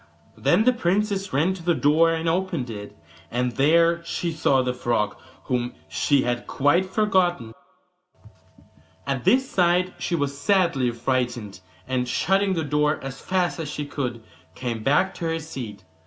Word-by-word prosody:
Then 215 Hz, -, +3 dB
the 255 Hz, +2 st, +4 dB
princess 200 Hz, -1 st, 0 dB
ran 160 Hz, +8 st, +2 dB
to 185 Hz, -, -9 dB
the 170 Hz, 0 st, +1 dB
door 160 Hz, +3 st, +4 dB
and 165 Hz, 0 st, -2 dB
opened 165 Hz, -7 st, -1 dB
it, 105 Hz, -4 st, -8 dB, 0.3 s
and 125 Hz, +4 st, -1 dB
there 165 Hz, +6 st, +3 dB
she 170 Hz, 0 st, -3 dB
saw 140 Hz, -4 st, +2 dB
the 125 Hz, 0 st, -1 dB
frog, 120 Hz, -4 st, -1 dB, 0.3 s
whom 125 Hz, -1 st, -2 dB
she 140 Hz, -2 st, +2 dB
had 120 Hz, 0 st, -2 dB
quite 170 Hz, +7 st, +2 dB
forgotten. 185 Hz, -, +1 dB, 1.5 s
At 135 Hz, -3 st, -2 dB
this 260 Hz, +1 st, +4 dB
sight 180 Hz, -1 st, +2 dB
she 175 Hz, -, -1 dB
was 145 Hz, -3 st, -1 dB
sadly 165 Hz, -5 st, +2 dB
frightened, 120 Hz, -4 st, -2 dB, 0.3 s
and 125 Hz, -1 st, -1 dB
shutting 195 Hz, +8 st, +2 dB
the 165 Hz, -, -1 dB
door 150 Hz, +1 st, +1 dB
as 135 Hz, -1 st, -7 dB
fast 180 Hz, -2 st, 0 dB
as 155 Hz, -3 st, -4 dB
she 145 Hz, 0 st, -4 dB
could 125 Hz, -5 st, -4 dB, 0.3 s
came 120 Hz, -3 st, -4 dB
back 145 Hz, +10 st, +2 dB
to 170 Hz, -, -6 dB
her 165 Hz, 0 st, 0 dB
seat. 130 Hz, -10 st, -8 dB
150 Hz, 155 wpm, -24 LUFS, 125-175 Hz, 1.5 s, the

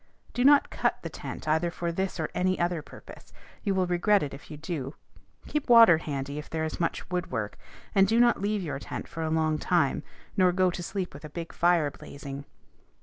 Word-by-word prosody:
Do 245 Hz, -, 0 dB
not 285 Hz, +1 st, +6 dB
cut -, -, -1 dB
the -, -, -5 dB
tent -, -, -7 dB
either 160 Hz, +3 st, +2 dB
for 170 Hz, 0 st, -3 dB
this 190 Hz, +1 st, -2 dB
or 160 Hz, -, -2 dB
any 185 Hz, +1 st, +1 dB
other 175 Hz, -2 st, 0 dB
purpose: -, -, -13 dB, 0.3 s
you 200 Hz, -3 st, 0 dB
will 185 Hz, -1 st, +2 dB
regret 180 Hz, +3 st, +3 dB
it 140 Hz, -, -4 dB
if 140 Hz, -, -11 dB
you 150 Hz, -, -7 dB
do. 150 Hz, -4 st, -5 dB, 0.5 s
Keep 300 Hz, -3 st, -3 dB
water 230 Hz, -9 st, +8 dB
handy 140 Hz, -2 st, -4 dB
if 150 Hz, -, -9 dB
there 160 Hz, -1 st, -2 dB
is 155 Hz, -, -3 dB
much 165 Hz, -, -2 dB
woodwork; 165 Hz, -, -2 dB, 0.4 s
and 195 Hz, 0 st, +5 dB
do 225 Hz, +1 st, +3 dB
not 240 Hz, -3 st, +4 dB
leave 205 Hz, -1 st, 0 dB
your 150 Hz, -4 st, -4 dB
tent -, -, -6 dB
for 165 Hz, -, -6 dB
a 160 Hz, -, -1 dB
long 155 Hz, -1 st, +1 dB
time, 170 Hz, -6 st, +1 dB, 0.3 s
nor 185 Hz, -2 st, +4 dB
go 185 Hz, 0 st, +3 dB
to 175 Hz, -, -5 dB
sleep 185 Hz, +1 st, -4 dB
with 140 Hz, -, -11 dB
a 155 Hz, -, -7 dB
big 165 Hz, +2 st, -7 dB
fire 170 Hz, -4 st, +3 dB
blazing. 140 Hz, 0 st, -9 dB
170 Hz, 210 wpm, -28 LUFS, 155-190 Hz, 0.5 s, water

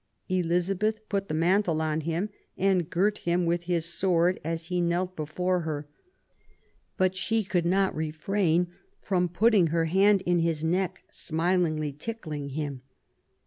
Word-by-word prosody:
Elizabeth 185 Hz, +5 st, 0 dB
put 200 Hz, -1 st, -1 dB
the -, -, -4 dB
mantle 170 Hz, 0 st, +2 dB
on 155 Hz, 0 st, 0 dB
him 170 Hz, +6 st, -2 dB, 0.3 s
and 185 Hz, -3 st, +2 dB
girt 205 Hz, +5 st, +1 dB
him 175 Hz, +1 st, 0 dB
with 170 Hz, +1 st, 0 dB
his 170 Hz, -2 st, 0 dB
sword, 175 Hz, +1 st, +1 dB
as 165 Hz, +1 st, -3 dB
he 180 Hz, +1 st, -1 dB
knelt 175 Hz, +2 st, 0 dB
before 180 Hz, +4 st, -1 dB
her; 150 Hz, -3 st, -4 dB, 1.1 s
"but 185 Hz, 0 st, +2 dB
she 220 Hz, +4 st, 0 dB
could 175 Hz, -3 st, 0 dB
not 190 Hz, +2 st, +2 dB
refrain 160 Hz, +3 st, +1 dB, 0.3 s
from 180 Hz, -2 st, 0 dB
putting 200 Hz, 0 st, +4 dB
her 165 Hz, +1 st, +1 dB
hand 195 Hz, +3 st, +4 dB
in 175 Hz, 0 st, +2 dB
his 165 Hz, -2 st, 0 dB
neck, 180 Hz, +3 st, -1 dB
smilingly 160 Hz, -3 st, 0 dB
tickling 150 Hz, -5 st, -6 dB
him 140 Hz, -2 st, -4 dB
175 Hz, 145 wpm, -27 LUFS, 160-190 Hz, 1.1 s, putting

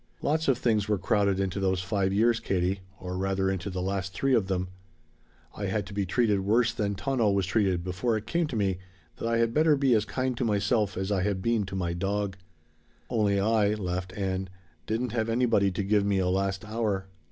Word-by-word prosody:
Lots 160 Hz, +2 st, +1 dB
of 135 Hz, -3 st, +3 dB
things 110 Hz, -4 st, +1 dB
were 105 Hz, -, +2 dB
crowded 100 Hz, +1 st, +1 dB
into 95 Hz, 0 st, -1 dB
those 95 Hz, -1 st, +1 dB
five 95 Hz, 0 st, 0 dB
years, 115 Hz, +3 st, +3 dB
Katie 95 Hz, +1 st, 0 dB, 0.2 s
or 90 Hz, 0 st, -5 dB
rather 95 Hz, 0 st, 0 dB
into 95 Hz, 0 st, -3 dB
the 90 Hz, -1 st, -3 dB
last 95 Hz, 0 st, -3 dB
three 135 Hz, +5 st, +1 dB
of 110 Hz, -6 st, +3 dB
them. 95 Hz, -1 st, -1 dB, 0.9 s
I 100 Hz, -, -3 dB
had 100 Hz, +1 st, -1 dB
to 100 Hz, -, -10 dB
be 100 Hz, -1 st, -1 dB
treated 105 Hz, 0 st, +2 dB
worse 110 Hz, +5 st, +2 dB
than 100 Hz, -3 st, -1 dB
Tono 120 Hz, +1 st, +1 dB
was 100 Hz, -1 st, +1 dB
treated 95 Hz, -3 st, +1 dB
before 95 Hz, +6 st, -1 dB
it 105 Hz, -, -6 dB
came 170 Hz, -1 st, 0 dB
to 130 Hz, -, -5 dB
me 95 Hz, -4 st, 0 dB, 0.4 s
that -, -, -3 dB
I 115 Hz, 0 st, +1 dB
had 115 Hz, 0 st, +1 dB
better 155 Hz, 0 st, +4 dB
be 135 Hz, -2 st, +3 dB
as 110 Hz, -1 st, +2 dB
kind 130 Hz, -1 st, -2 dB
to -, -, -1 dB
myself 105 Hz, -1 st, +1 dB
as 95 Hz, +2 st, -2 dB
I 95 Hz, -2 st, +1 dB
had 100 Hz, 0 st, 0 dB
been 115 Hz, -3 st, +1 dB
to 95 Hz, -, -6 dB
my 85 Hz, -3 st, -1 dB
dog. 100 Hz, +2 st, -2 dB, 0.8 s
Only 105 Hz, -4 st, +2 dB
I," 110 Hz, +1 st, +3 dB
Ann 105 Hz, +1 st, 0 dB
laughed, 90 Hz, -1 st, -4 dB, 0.7 s
"didn't 115 Hz, +2 st, -1 dB
have 115 Hz, -1 st, -1 dB
anybody 115 Hz, -4 st, +3 dB
to 95 Hz, +2 st, -3 dB
give 100 Hz, +1 st, +2 dB
me 100 Hz, -1 st, +1 dB
a 90 Hz, -1 st, +1 dB
last 95 Hz, +1 st, -1 dB
hour!" 105 Hz, -3 st, -1 dB
100 Hz, 215 wpm, -28 LUFS, 95-115 Hz, 0.9 s, better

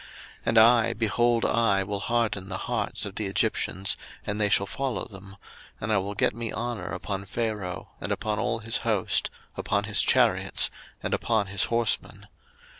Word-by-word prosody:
02:014:017 -, -, -15 dB, 0.4 s
And 115 Hz, -, +2 dB
I, 115 Hz, +1 st, +6 dB
behold, 115 Hz, +1 st, +2 dB
I 100 Hz, -4 st, +2 dB
will 100 Hz, +1 st, -3 dB
harden 110 Hz, -4 st, -1 dB
the 95 Hz, -, -3 dB
hearts -, -, -2 dB
of 100 Hz, -, -6 dB
the 105 Hz, 0 st, -2 dB
Egyptians, 95 Hz, 0 st, 0 dB, 0.3 s
and 105 Hz, +1 st, -2 dB
they 105 Hz, -, +3 dB
shall 100 Hz, -, +4 dB
follow 135 Hz, +3 st, -3 dB
them: 95 Hz, -1 st, -11 dB, 0.4 s
and 110 Hz, +1 st, -1 dB
I 105 Hz, -, +4 dB
will 100 Hz, +2 st, -4 dB
get -, -, +2 dB
me 115 Hz, 0 st, -4 dB
honour 115 Hz, -6 st, -4 dB
upon 100 Hz, -1 st, -4 dB
Pharaoh, 105 Hz, -4 st, -4 dB
and -, -, -3 dB
upon 105 Hz, -1 st, -1 dB
all 115 Hz, +3 st, 0 dB
his 115 Hz, +1 st, -2 dB
host, 105 Hz, -5 st, +1 dB, 0.3 s
upon -, -, 0 dB
his -, -, +4 dB
chariots, -, -, +3 dB, 0.3 s
and -, -, -2 dB
upon 110 Hz, -3 st, +1 dB
his 100 Hz, -, +3 dB
horsemen. 115 Hz, 0 st, -1 dB
105 Hz, 175 wpm, -27 LUFS, 100-115 Hz, 0.4 s, I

